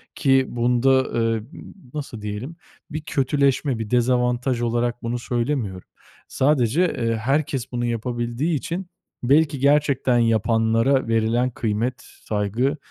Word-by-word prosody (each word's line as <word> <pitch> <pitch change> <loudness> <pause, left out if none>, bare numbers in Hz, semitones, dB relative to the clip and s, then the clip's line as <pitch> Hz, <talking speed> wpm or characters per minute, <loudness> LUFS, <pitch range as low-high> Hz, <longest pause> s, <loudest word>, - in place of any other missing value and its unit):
ki 135 -2 +3
bunda, 120 +2 +1
ııı, 115 -3 0 0.2
ımm, - - -11 0.2
nasıl 140 -7 -6
diyelim 105 +9 -5 0.4
bir 155 +1 -4
kötüleşme, 140 -2 0
bir 110 -2 -4
dezavantaj 125 0 +1
olarak 120 +1 -1
bunu 120 +1 -2
söylemiyorum. 120 -6 -2 0.4
Sadece, 135 +2 +2 0.2
ııı, 115 -1 0
herkes 135 +2 -1
bunu 120 -1 -2
yapabildiği 120 +6 -2
için 170 +5 -4 0.4
belki 145 +2 +3
gerçekten 140 -3 +3
yapanlara 115 +3 +2
verilen 115 +2 +1
kıymet, 115 +1 -2 0.3
saygı 110 +8 -1
125 Hz, 115 wpm, -22 LUFS, 115-135 Hz, 0.4 s, ki